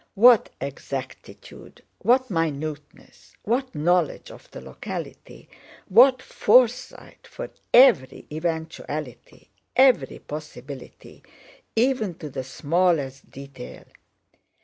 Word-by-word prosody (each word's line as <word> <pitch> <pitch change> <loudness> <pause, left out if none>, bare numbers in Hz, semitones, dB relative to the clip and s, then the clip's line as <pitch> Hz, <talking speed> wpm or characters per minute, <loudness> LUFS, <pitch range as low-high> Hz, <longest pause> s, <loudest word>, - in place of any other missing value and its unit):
What 235 +3 +6
exactitude, - - -8 0.2
what 255 0 +2
minuteness, 155 -3 -5
what 255 +2 -2
knowledge 170 +1 0
of - - -15
the - - -10
locality, - - -9 0.4
what 255 +5 +6
foresight 250 0 +1
for - - -8 0.2
every 190 - +5
eventuality, 160 +1 -6 0.2
every 250 - +4
possibility 145 -3 -10 0.5
even 225 -6 +1
to 150 -3 -9
the 130 - -5
smallest 145 0 -1
detail! 135 - -11
170 Hz, 85 wpm, -24 LUFS, -, 0.5 s, What